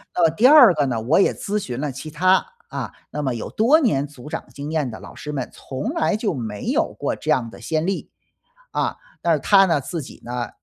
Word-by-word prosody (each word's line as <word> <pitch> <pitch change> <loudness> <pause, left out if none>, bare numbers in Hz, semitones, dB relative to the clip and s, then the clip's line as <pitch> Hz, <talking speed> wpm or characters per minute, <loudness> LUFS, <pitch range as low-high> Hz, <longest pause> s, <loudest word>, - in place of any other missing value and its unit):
那 175 - +2
么 165 - +6
第 190 +11 +4
二 265 -9 +9
个 150 -3 +1
呢， 120 -4 -1
我 130 +11 +3
也 - - +4
咨 210 +1 -2
询 125 -9 -5
了 150 - -2
其 155 +5 -8
他， 185 +5 +3 0.2
啊， - - -5 0.2
那 150 - -3
么 130 -4 -1
有 115 - -5
多 255 +9 +4
年 145 - +1
组 145 0 -12
长 - - -5
经 145 +2 -6
验 150 -5 0
的 110 - -8
老 - - -11
师 150 0 -6
们， 130 -3 -3
从 135 - -5
来 310 -8 +1
就 215 -4 -1
没 110 -6 -5
有 - - +1
过 - - -1
这 155 - -7
样 130 -7 +2
的 - - -13
先 160 0 -1
例。” 195 +1 -2 0.6
啊， - - -1 0.3
但 170 -1 +3
是 150 - +1
他 195 +7 +5
呢， 165 -6 +1
自 160 +2 -5
己 - - -12
呢， 120 0 -4
150 Hz, 260 characters per minute, -22 LUFS, 130-190 Hz, 0.6 s, 二